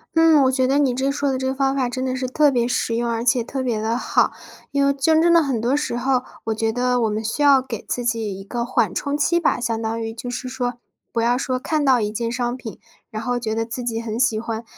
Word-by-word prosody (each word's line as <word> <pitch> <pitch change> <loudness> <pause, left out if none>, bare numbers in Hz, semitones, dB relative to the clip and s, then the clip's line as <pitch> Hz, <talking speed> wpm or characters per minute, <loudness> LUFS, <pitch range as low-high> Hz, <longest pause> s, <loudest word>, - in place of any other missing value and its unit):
嗯， 325 -3 +6
我 260 - +3
觉 260 -1 +1
得 270 +2 +2
你 275 -3 +2
这 265 +2 0
说 285 0 0
的 260 - -2
这 260 - -2
个 265 - -1
方 270 0 +1
法 260 -3 0
真 255 +1 -3
的 255 0 -1
是 255 0 -2
特 290 +3 +3
别 240 -2 +1
实 245 -2 -1
用， 235 0 -1
而 230 0 -1
且 250 -1 +3
特 265 +3 -4
别 230 -4 -1
地 225 +2 0
好。 - - +2 0.4
因 280 0 +1
为 280 - +3
真 315 +4 +3
正 340 +1 +4
的 335 - +6
很 270 -6 -1
多 240 +5 +1
时 290 -5 -1
候， 255 0 +1 0.2
我 225 - -1
觉 220 +1 0
得 250 +1 +1
我 225 - +2
们 215 +1 -2
需 225 +6 -3
要 280 -2 +6
给 235 -5 -6
自 245 - -2
己 220 -5 -2
一 - - -8
个 235 +4 -3
缓 240 - 0
冲 285 0 -2
期 340 +3 +2
吧， 330 - +1
相 230 -2 -2
当 225 0 -2
于 225 0 -4
就 240 +2 -7
是 250 +1 -5
说 250 -1 -3 0.4
不 230 - 0
要 235 +1 +2
说 255 0 -1
看 300 +4 -1
到 265 -3 +4
一 210 -1 -1
件 230 +1 -2
商 240 0 -1
品， 240 -4 -8 0.3
然 215 +1 -5
后 245 0 -1
觉 220 -2 -3
得 225 0 -1
自 235 +2 -6
己 230 -2 -2
很 230 0 -4
喜 225 -3 +2
欢， 225 0 -4
245 Hz, 300 characters per minute, -22 LUFS, 230-270 Hz, 0.4 s, 嗯